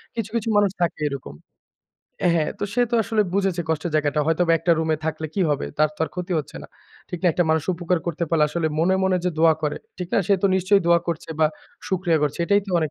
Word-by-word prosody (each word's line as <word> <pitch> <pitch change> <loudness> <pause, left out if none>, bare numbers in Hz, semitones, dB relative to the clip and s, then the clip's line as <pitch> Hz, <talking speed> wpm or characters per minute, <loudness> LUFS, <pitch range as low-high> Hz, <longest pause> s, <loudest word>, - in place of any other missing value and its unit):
কিছু, 225 -3 -3
কিছু, 225 0 -1
মানুষ 205 -2 +3
থাকে 170 -2 -1
এরকম 120 - -7 1.0
হ্যাঁ, 155 -2 +1 0.3
সে 245 - +2
তো - - 0
আসলে 215 0 +1
বুঝেছে 190 -3 0
কষ্টের 160 +1 -1
জায়গাটা। 150 -1 +1
হয়তোবা 165 +1 +2
একটা 170 - +2
রুমে 160 -1 +1
থাকলে 160 0 -2
কি 200 - -1
হবে? 145 - -1
তার 155 - +4
তো - - -22
আর - - -7
ক্ষতি 180 0 -4
হচ্ছে 150 - -7
না, - - -9 0.4
ঠিক 180 - -5
না? 185 - +2
একটা 175 - +1
মানুষ 160 -1 +1
উপকার 175 0 0
করতে 170 0 -1
পারলে 160 -2 +3
আসলে 170 +1 -1
মনে, 180 +3 +3
মনে, 185 -1 +2
যে 180 - +1
দোয়া 160 -1 +5
করে। 150 - -1 0.2
ঠিক 180 - -4
না? - - +3
সে 200 - +4
তো - - +5
নিশ্চয়ই 195 +1 +3
দোয়া 170 0 +5
করছে 165 -1 -4
বা 155 - +6 0.4
শুকরিয়া 175 -4 +1
করছে। 150 +1 -1
এটাই 200 +3 +3
তো 195 - -6
অনেক 155 -3 -1
170 Hz, 235 wpm, -23 LUFS, 155-185 Hz, 1.0 s, বা